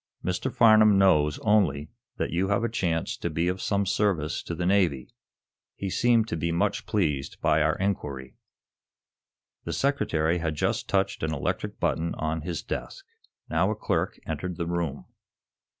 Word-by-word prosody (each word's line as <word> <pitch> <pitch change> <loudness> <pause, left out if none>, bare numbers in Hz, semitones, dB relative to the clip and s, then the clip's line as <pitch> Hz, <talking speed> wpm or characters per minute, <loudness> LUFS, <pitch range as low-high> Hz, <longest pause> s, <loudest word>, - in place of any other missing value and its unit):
"Mr. 90 +8 -1
Farnum 110 -3 +6
knows, 75 -6 +4
only, 80 -9 +2 0.3
that - - -2
you 90 +4 0
have 100 +3 +1
a 115 - +1
chance 85 -7 -1
to 85 - -3
be 85 +2 -1
of 90 +1 -2
some 100 -1 0
service 90 -6 0
to 85 - -5
the 85 - -2
Navy. 90 -9 +1 0.6
He 100 -1 -4
seemed 115 0 +3
to - - -2
be 85 +1 -1
much 100 +4 -1
pleased 75 -10 -1
by 75 - +2
our 80 0 +2
inquiry." 70 -10 -3 1.3
The - - -4
Secretary 85 - +1
had 80 -2 -2
just - - -1
touched - - 0
an 80 - -1
electric 70 - -3
button 85 +1 -1
on 80 +1 -2
his 85 0 -4
desk. - - -6 0.4
Now - - +1
a - - -1
clerk - - -1
entered 80 +3 -4
the 85 - -2
room. 85 -5 -3
85 Hz, 165 wpm, -26 LUFS, 80-100 Hz, 1.3 s, Farnum